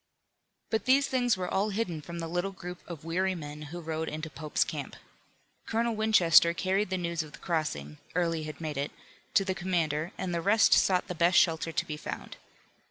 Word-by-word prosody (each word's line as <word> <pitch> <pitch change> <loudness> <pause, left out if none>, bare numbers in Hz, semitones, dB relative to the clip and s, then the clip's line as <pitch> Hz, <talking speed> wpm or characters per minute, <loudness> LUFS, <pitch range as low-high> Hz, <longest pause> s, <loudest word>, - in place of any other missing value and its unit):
But 220 - 0
these 275 +2 +5
things 245 -6 +1
were 180 -1 -2
all 200 +4 +1
hidden 195 -7 -2
from 170 +3 -8
the 165 -1 -3
little 175 +4 -1
group 180 -1 -8
of 165 -2 -8
weary 185 +3 0
men 150 -2 -7
who 175 +2 -6
rode 160 -1 -3
into 155 +1 -5
Pope's 155 -1 0
camp. - - -6 0.7
Colonel 230 0 0
Winchester 175 -6 +5
carried 190 +3 0
the 185 - 0
news 170 -2 -1
of 155 -1 -9
the - - -9
crossing 110 - -3 0.2
Early 165 -2 +1
had 155 -2 -7
made 155 -3 -4
it 140 +1 -1 0.5
to 195 - +5
the 190 - 0
commander, 170 -4 -1
and 180 -2 -3
the 170 - 0
rest 205 +4 +5
sought 185 -2 +3
the - - -3
best 175 +1 +3
shelter 165 -1 +3
to 170 - -1
be 155 -3 -5
found. - - -7
170 Hz, 200 wpm, -29 LUFS, 160-190 Hz, 0.7 s, these